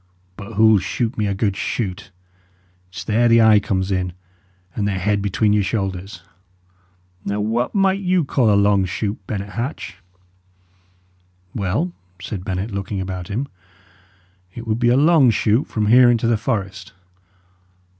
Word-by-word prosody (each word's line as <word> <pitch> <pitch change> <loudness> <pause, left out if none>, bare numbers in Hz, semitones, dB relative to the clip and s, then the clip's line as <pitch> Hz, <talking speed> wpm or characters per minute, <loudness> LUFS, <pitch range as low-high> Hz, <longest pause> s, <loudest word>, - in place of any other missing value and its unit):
But 100 +3 -9
who'll 110 0 +5
shoot 115 +5 -2
me 105 -1 -1
a 100 - -1
good 100 0 0
shoot? 100 -4 -4 0.8
It's 90 - -8
there 115 +2 +2
the 115 0 +5
eye 110 -2 +6
comes 95 -1 -2
in, 90 -2 -1 0.6
and 105 -2 -1
the 100 - 0
head 100 +2 0
between 105 +1 +1
your 105 - +3
shoulders. 95 -3 -4 1.0
Now, 100 +1 -2
what 115 - -1
might 195 -1 +2
you 180 -4 +1
call 125 -5 +2
a 100 - +4
long 100 -1 +3
shoot, 100 +3 -3
Bennet 100 -1 -4
Hatch?" 115 - -5 1.6
"Well," 110 - -1 0.3
said 95 -1 -6
Bennet, 95 +2 -3
looking 100 0 -4
about 95 -1 -5
him, 115 +7 -3 1.1
"it 115 - -7
would 110 0 -1
be 120 -1 +3
a 125 - +4
long 150 -3 +5
shoot 110 +3 +1
from 110 -1 -2
here 120 +3 +6
into 120 -1 +1
the 115 0 +3
forest." 100 -4 -4
105 Hz, 155 wpm, -20 LUFS, 95-120 Hz, 1.6 s, eye